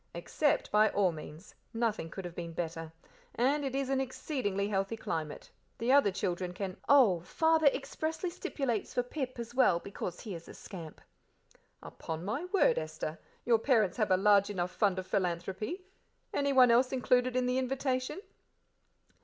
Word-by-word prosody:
"Accept 280 - 0
by 215 +1 +5
all 195 -3 +2
means; 155 +3 -10 0.2
nothing 225 -7 -1
could 190 +2 -7
have 175 - -6
been 170 -1 -6
better; 165 -1 -4 0.4
and 280 +5 +2
it 270 -1 -3
is 275 -1 0
an 270 0 +1
exceedingly 250 -7 -2
healthy 195 +2 -1
climate. 160 -7 -5 0.3
The 235 +3 0
other 280 -6 +6
children 180 -2 -2
can 190 -1 -4
" - - -19
"Oh, 245 -11 +6
Father 320 - +2
expressly 315 +5 -1
stipulates 255 - -3
for 245 - +2
Pip 255 0 -5
as 235 0 -6
well, 250 -9 +4
because 180 -2 -6
he 210 - -6
is 170 -1 -9
a - - -10
scamp." 165 -5 -10 0.8
"Upon 160 +1 -6
my 235 - -2
word, 370 - +3
Esther, 155 0 -5 0.3
your 235 -2 +4
parents 225 -5 +2
have 215 -3 +1
a 185 - +4
large 200 0 +4
enough 180 -3 -2
fund 200 -3 +1
of 185 - -3
philanthropy. 190 - -2 0.5
Anyone 265 -4 +5
else 250 +2 +4
included 250 -1 +2
in 255 0 +2
the 250 +1 +1
invitation?" 260 +4 -2
220 Hz, 165 wpm, -31 LUFS, 180-265 Hz, 0.8 s, other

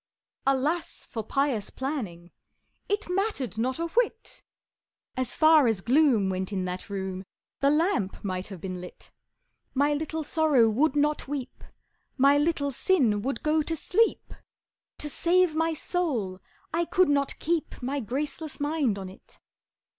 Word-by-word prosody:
Alas 285 +6 0
for 225 - -4
pious 255 -3 0
planning 210 - -5 0.6
It 415 +1 -1
mattered 360 - -1
not 255 +3 0
a 335 - -1
whit! 455 +3 -1 0.7
As 255 -2 -1
far 310 -4 +6
as 220 -4 +1
gloom 250 -4 +4
went 190 +1 -2
in 190 -2 -1
that 180 +2 -5
room, 190 -1 -4 0.4
The 275 - +3
lamp 300 - +1
might 185 -2 -3
have 195 -4 -8
been 185 0 -5
lit! 180 - -11 0.6
My 285 +2 +3
little 315 +2 -2
Sorrow 290 -7 +3
would 265 +6 +2
not 295 0 +1
weep, 275 -3 -5 0.5
My 280 +1 +6
little 295 -2 +1
Sin 245 - +2
would 270 +5 -3
go 310 +1 +3
to 325 +2 -1
sleep 445 +8 +1 0.6
To 295 - -4
save 350 +3 +2
my 325 +1 +1
soul 255 - -2 0.3
I 335 +1 +2
could 370 +2 +3
not 280 -1 +1
keep 330 0 -2
My 275 +3 -1
graceless 280 +6 -4
mind 290 -7 0
on 190 -1 -6
it! 185 - -14
280 Hz, 145 wpm, -27 LUFS, 210-315 Hz, 0.7 s, far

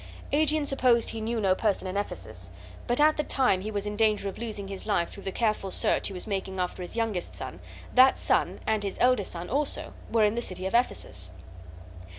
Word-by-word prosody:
Aegeon 305 0 +3
supposed 250 -4 +3
he 225 - -5
knew 230 +1 -1
no 195 -3 +3
person 200 0 0
in 185 - -4
Ephesus; 110 - -3 0.4
but 240 +2 +1
at 305 +1 +5
the 300 - +1
time 255 -11 +2
he 210 - -4
was 205 -1 -2
in 210 0 -3
danger 215 -2 +2
of - - -9
losing 215 -4 -4
his 195 +1 -6
life 175 -5 +1
through 200 - -10
the 195 - -4
careful 215 -2 0
search - - +1
he - - -6
was 180 - -4
making 190 -2 -3
after 180 0 -2
his 180 - -6
youngest 220 -6 -1
son - - -7 0.3
that 260 +1 +7
son, - - +1
and 220 -1 +1
his 200 -2 -3
eldest 250 -5 +3
son 170 0 -5
also, 285 +3 -1 0.2
were 225 -2 +4
in 210 - +2
the 235 - -1
city 185 -4 -5
of 190 - -2
Ephesus. 90 - 0
210 Hz, 215 wpm, -28 LUFS, 190-235 Hz, 0.4 s, that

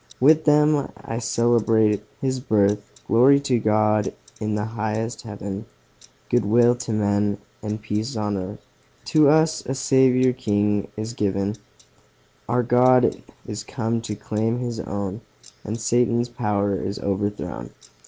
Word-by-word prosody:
With 155 +4 +5
them 150 -1 +3
I 115 +1 -5
celebrate 115 -3 +2 0.2
His 130 -2 -1
birth 105 -4 +1 0.2
Glory 130 +5 +5
to 130 -4 +1
God, 105 -1 +2 0.3
in 105 0 -2
highest 110 +1 -3
Heaven, 100 -1 -7 0.6
Good 120 -1 +2
will 120 +4 +4
to 120 - -5
men, 100 -1 +1 0.2
and 105 0 -4
peace 110 +4 -3
on 105 -1 -1
earth, 95 +2 -6 0.5
To 155 -2 +6
us 160 +1 +3
a 135 - -3
Saviour 130 -1 +3
king 105 -4 0
is 110 +2 -4
given; 100 -2 -1 0.9
Our 120 +1 +2
God 125 +1 +4 0.2
is 105 0 -6
come 115 0 -2
to 105 -2 -5
claim 110 +3 -2
His 120 -2 -4
own, 100 +1 -4 0.4
And 110 +3 -4
Satan's 120 +1 +1
power 100 -4 -1
is 95 +2 -4
overthrown! 100 -10 -3
110 Hz, 135 wpm, -23 LUFS, 105-125 Hz, 0.9 s, To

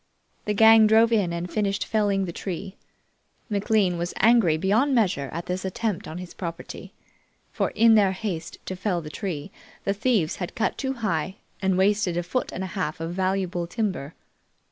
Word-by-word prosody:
The 210 - 0
gang 220 0 +7
drove 225 +2 +5
in 200 -6 +2
and 170 +1 -3
finished 200 +1 -1
felling 205 -3 +1
the 170 - -6
tree. 190 +2 -5 0.8
McLean 200 -3 +1
was 175 +1 -3
angry 215 -8 +4
beyond 220 - +2
measure 180 - +1
at 170 +2 -5
this 180 +1 -3
attempt 195 0 -2
on 160 - -6
his 180 -1 -8
property, 170 -2 -7 0.6
for - - 0
in 225 +1 +6
their 200 -3 +4
haste 185 -5 -5
to 185 - -4
fell 185 -2 -1
the 150 -1 -8
tree 155 -3 -5 0.3
the 195 - +1
thieves 205 -6 +1
had 180 +4 -5
cut 230 - 0
too 265 -1 -2
high 190 - -2 0.3
and 190 -1 +1
wasted 195 -2 +2
a 175 - 0
foot 255 +9 -2
and 190 - -4
a 185 - -6
half 180 -6 -3
of 165 +1 -4
valuable 185 -2 -1
timber. 180 - -3
190 Hz, 180 wpm, -25 LUFS, 175-215 Hz, 0.8 s, gang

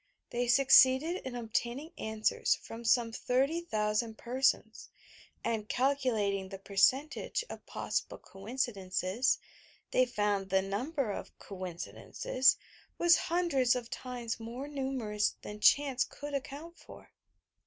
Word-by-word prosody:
They 245 +1 -1
succeeded 265 +5 +6
in 260 -2 -6
obtain 235 +1 -2
ing 310 +4 -9
answers 220 0 0
from 230 +1 -10
some 230 0 +3
30,000 235 -5 0
persons, 260 +3 0 0.5
and, 225 -2 -2
calculating 230 -8 0
the 195 - -7
percentage 255 - +1
of - - -9
possible - - -3
coincidences, 195 0 -1 0.5
they 255 0 +3
found 205 -4 0
that 190 0 +3
the - - -6
number 250 +4 -2
of - - -7
"coincidences" 185 - 0 0.4
was 345 0 +6
hundreds 310 -8 +2
of 245 -2 -5
times 245 -3 -5
more 235 +5 -6
numerous 260 -7 -1
than 210 0 -7
chance 270 +2 +4
could 290 0 -8
account 285 +5 -6
for. - - -14
240 Hz, 120 wpm, -31 LUFS, 210-270 Hz, 0.5 s, succeeded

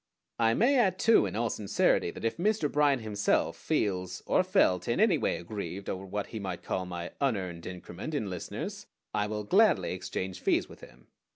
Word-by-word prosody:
I 115 0 +3
may 255 +4 +4
add 190 -6 +3
too 225 -1 +5
in - - -6
all 115 +1 0
sincerity 100 -3 +1
that 100 - -7
if 115 - -1
Mr. 195 -4 +1
Bryan 145 -3 +3
himself 105 -2 0
feels, 95 -2 -1
or - - +3
felt, 185 - +2
in - - 0
any - - +4
way - - 0
aggrieved 95 +1 -6
over 95 +1 -6
what 100 +1 -3
he 110 - -3
might 95 -3 -5
call 95 -1 -2
my 85 -1 -5
"unearned 95 -11 -1
increment" 90 - -6
in 110 -8 -1
listeners, 90 -3 -6 0.3
I 105 - 0
will 105 0 -3
gladly 195 - +3
exchange 95 0 -4
fees - - +1
with - - -14
him. - - -15
105 Hz, 190 wpm, -29 LUFS, 90-145 Hz, 0.3 s, too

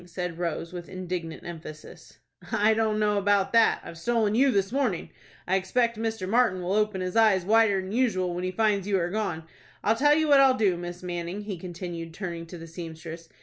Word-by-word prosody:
said 180 -1 -5
Rose, 170 0 -3
with 175 -1 -7
indignant 180 -3 -5
emphasis. 155 -2 -10 0.3
"I 215 +2 +3
don't 220 -1 +1
know 210 -1 +2
about 200 0 +2
that. 230 -1 +4
I've 165 - -10
stolen 225 0 +1
you 265 +5 +4
this 195 -4 +1
mornin'. 250 -10 -1 0.4
I 190 +1 +3
expect 230 +5 0
Mr. 220 -3 -3
Martin 200 -4 +2
will 180 +2 -1
open 210 -2 +1
his 185 0 -3
eyes 215 -5 +4
wider'n 205 -3 +3
usual 205 -7 +1
when 175 +1 -4
he 185 - -1
finds 205 0 +1
you 200 -2 +2
are 175 -1 -1
gone. 200 -6 -2 0.4
I'll 220 - +3
tell 295 +4 +4
you 315 0 +2
what 285 -2 +6
I'll 265 -1 +5
do, 200 -6 +2
Miss 175 +1 -7
Manning," 175 +2 -4
he 205 -2 -5
continued, 170 -2 -7
turning 170 -3 -5
to 175 - -9
the 165 - -9
seamstress. 165 0 -9
190 Hz, 200 wpm, -27 LUFS, 175-220 Hz, 0.4 s, what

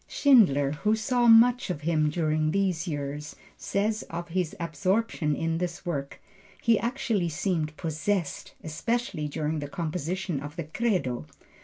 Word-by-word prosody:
Schindler, 180 - +4
who 210 +9 +1
saw 240 +2 +1
much 235 +1 +6
of 175 -5 -3
him 155 -1 +2
during 155 -1 0
these 185 -1 0
years, 145 -1 -4 0.2
says 210 +2 -1
of 170 +1 -5
his 175 -1 -1
absorption 170 0 0
in 165 +1 -1
this 175 +1 -4
work: 140 -5 -4 0.4
"He 230 -2 +3
actually 230 -7 -1
seemed 155 -2 -2
possessed, 165 +2 -2
especially 165 - -2
during 155 +1 -2
the 145 - -4
composition 175 0 -3
of 145 +2 -8
the 170 - -3
Credo." 155 - -1
170 Hz, 140 wpm, -27 LUFS, 150-205 Hz, 0.4 s, much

